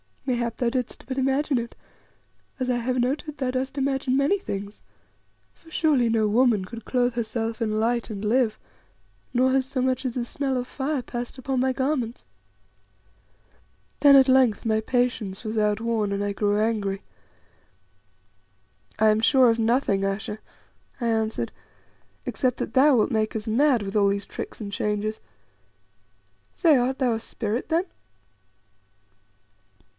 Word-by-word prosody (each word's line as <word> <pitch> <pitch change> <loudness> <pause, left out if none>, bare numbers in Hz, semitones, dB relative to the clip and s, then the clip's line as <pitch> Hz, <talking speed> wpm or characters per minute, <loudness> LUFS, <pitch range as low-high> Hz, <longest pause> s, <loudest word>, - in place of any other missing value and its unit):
Mayhap 235 -3 -1
thou 245 - +1
didst 250 -1 -4
but 260 -1 -4
imagine 270 +1 +1
it, 235 0 -6 0.8
as 255 -1 -1
I 245 - +2
have 250 +2 -1
noted 285 +4 -1
thou 260 -2 -1
dost 265 +2 -3
imagine 270 -1 0
many 285 +9 +2
things; 200 - -6 0.7
for 325 - -20
surely 295 -7 +2
no 220 -1 +2
woman 225 -2 +3
could 230 +2 -9
clothe 245 -1 +1
herself 230 0 -3
in 215 -1 0
light 235 +1 0
and 205 -2 -6
live, 225 0 +2 0.8
nor 260 +1 +3
has 265 0 +2
so 265 -1 -3
much 260 +1 0
as 245 - -2
the 250 - -1
smell 270 +1 -2
of 250 0 -3
fire 275 +1 -2
passed 240 +2 -6
upon 260 0 -2
my 260 +1 +2
garments." 260 -3 -2 1.7
Then 285 -1 +7
at 270 -1 +6
length 255 -5 +3
my 220 -1 +2
patience 220 -4 -1
was 220 0 -4
outworn, 215 0 0
and 200 0 -1
I 205 - -1
grew 205 0 +1
angry. 210 -3 -1 1.9
"I 220 - +4
am 215 0 +3
sure 255 +2 +5
of 230 - -1
nothing, 225 -4 +1
Ayesha," 205 +2 -3 0.6
I 235 - 0
answered, 225 0 -1 0.7
"except 255 -3 -1
that - - -4
thou 275 +1 +5
wilt 220 - +2
make 215 -1 0
us 220 +1 -4
mad 245 0 +3
with 195 +1 -6
all 205 -1 +4
these 200 0 -1
tricks - - -7
and 200 -1 -5
changes. 210 +1 -2 1.4
Say, 320 -6 +4
art 255 +2 0
thou 250 -3 +2
a 225 - -2
spirit 225 +1 -4
then?" 330 +2 +2
240 Hz, 155 wpm, -25 LUFS, 215-260 Hz, 1.9 s, Then